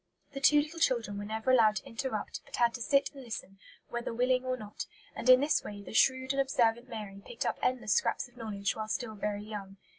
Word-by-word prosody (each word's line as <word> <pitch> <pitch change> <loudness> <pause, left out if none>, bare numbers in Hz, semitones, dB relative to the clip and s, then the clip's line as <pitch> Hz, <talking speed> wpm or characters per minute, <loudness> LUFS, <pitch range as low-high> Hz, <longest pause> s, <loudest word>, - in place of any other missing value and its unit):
The 275 - -5
two 295 +1 +6
little 310 +3 -3
children 230 -9 +1
were 205 - -5
never 220 +4 0
allowed 220 -4 +5
to 190 - -4
interrupt, 230 -3 -4
but - - -8
had 235 -1 +3
to 245 - -6
sit 275 +2 +2
and 275 -2 -10
listen, 195 -4 -7 0.3
"whether 240 0 -3
willing 250 +2 +2
or 255 0 -1
not"; 210 -3 -7 0.3
and 255 - -1
in 255 +1 +9
this 295 +2 +2
way 205 -1 -7
the - - -9
shrewd 260 +3 +3
and 275 - +2
observant 240 -2 +1
Mary 210 -4 -7
picked 235 - -5
up - - -1
endless 240 -5 +1
scraps - - +1
of 245 - -25
knowledge 210 -4 -2
while 215 -1 -4
still 220 0 -2
very 210 0 -3
young. 200 -2 -7
235 Hz, 230 wpm, -31 LUFS, 210-260 Hz, 0.3 s, in